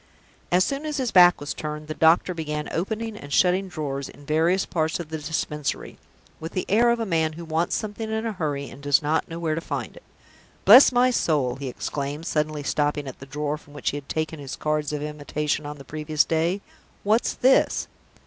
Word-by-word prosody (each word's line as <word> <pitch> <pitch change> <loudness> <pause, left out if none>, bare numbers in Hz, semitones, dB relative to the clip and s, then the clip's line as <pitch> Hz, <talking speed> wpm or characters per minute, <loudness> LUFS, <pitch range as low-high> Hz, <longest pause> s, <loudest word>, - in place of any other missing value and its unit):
As 180 +1 +5
soon 280 +6 -3
as 300 - -2
his 255 -4 -1
back 180 -1 +7
was 145 - -4
turned, 150 0 -6
the 155 - -3
doctor 165 +4 +4
began 150 -2 -4
opening 220 +5 -3
and 145 -8 -10
shutting 185 +5 +3
drawers 145 -5 -4
in 145 - -15
various 165 +6 +2
parts 160 -1 -1
of 170 -3 -6
the 160 0 -4
Dispensary, 150 -1 -3 0.4
with 160 +1 -7
the 185 - -2
air 235 +4 +4
of 235 0 +2
a 225 - -1
man 160 -4 +1
who 170 +2 -8
wants 165 +2 0
something 220 +1 -4
in 220 +1 -2
a 225 - -1
hurry, 145 -7 -3
and 140 - -12
does 145 0 +3
not 155 +2 0
know 165 - -6
where 165 -2 -1
to 165 - -2
find - - -5
it. - - -13 0.6
"Bless 250 +7 +9
my 250 +1 +4
soul!" 140 - +1
he 140 0 -5
exclaimed, 140 +4 -4
suddenly 150 -2 -1
stopping 145 0 0
at 130 - -8
the 135 - -10
drawer 150 +1 -3
from 145 - -18
which 145 - -1
he 145 - -4
had 140 -1 -10
taken 155 0 -2
his 140 -2 -6
cards 150 -1 -1
of 150 -1 -3
invitation 150 0 -2
on 150 0 -7
the 140 - -11
previous 155 +1 0
day, 165 +5 0 0.4
"what's 215 +3 +2
this? 260 +1 +3
155 Hz, 215 wpm, -24 LUFS, 150-185 Hz, 0.6 s, Bless